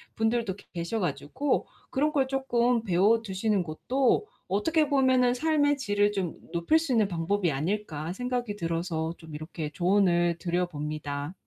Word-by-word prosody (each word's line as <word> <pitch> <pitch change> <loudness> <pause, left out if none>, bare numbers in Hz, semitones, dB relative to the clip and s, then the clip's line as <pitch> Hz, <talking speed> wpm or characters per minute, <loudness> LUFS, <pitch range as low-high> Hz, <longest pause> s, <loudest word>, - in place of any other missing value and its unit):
분들도 225 -3 0 0.2
계셔 170 +6 -2
가지고 250 - -1 0.2
‘그런 300 +3 +1
걸 275 -3 +1
쪼끔 245 -3 +1
배워두시는 205 +1 +2
것도 250 - +1 0.2
어떻게 305 - +2
보면은 260 -3 +4
삶의 290 +1 +2
질을 205 -5 +1
좀 190 -5 -2 0.2
높일 170 - +3
수 320 -4 -3
있는 220 -4 +3
방법이 175 +1 0
아닐까.‘ 160 +1 -2
생각이 245 -1 -2
들어서 165 -2 -2
좀 160 -2 -12
이렇게 155 0 -5
조언을 175 -1 +2
드려 175 +1 0
봅니다. 150 -1 -4
205 Hz, 315 characters per minute, -28 LUFS, 170-250 Hz, 0.2 s, 보면은